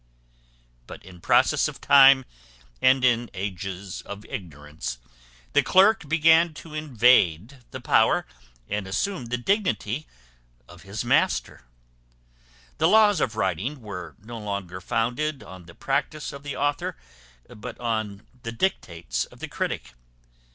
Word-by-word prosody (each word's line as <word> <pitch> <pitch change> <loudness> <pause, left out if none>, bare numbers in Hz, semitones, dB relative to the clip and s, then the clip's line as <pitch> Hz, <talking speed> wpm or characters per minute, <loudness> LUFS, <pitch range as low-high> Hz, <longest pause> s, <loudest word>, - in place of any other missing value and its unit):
But - - -11
in 90 -2 -14
process - - +3
of - - -8
time, 135 -2 +7 0.6
and 130 0 +4
in 120 -1 +2
ages 95 0 -5
of 100 +1 -9
ignorance, 75 -7 -7 0.6
the - - +5
clerk 190 -4 +4
began 165 +1 +4
to 155 0 -11
invade 125 - +2
the - - -7
power - - +3 0.4
and 105 -1 -3
assume 125 - -2
the 120 +1 -2
dignity 125 - -1 0.6
of 90 -1 -14
his 100 +6 -6
master. 120 - +1 1.1
The - - +4
laws 210 -2 +5
of 115 -3 -1
writing 125 +5 -2
were 95 -5 -8
no 115 +3 -9
longer 100 -4 -5
founded 125 +9 -1
on 95 -2 -12
the 85 - -14
practice 140 +2 -2
of 140 - -9
the 140 -1 -6
author, 145 - -1 0.5
but 115 +2 -9
on 110 -4 -3 0.2
the 115 - -5
dictates 85 - -2
of - - -18
the - - -5
critic. - - -4
115 Hz, 130 wpm, -25 LUFS, 95-145 Hz, 1.1 s, time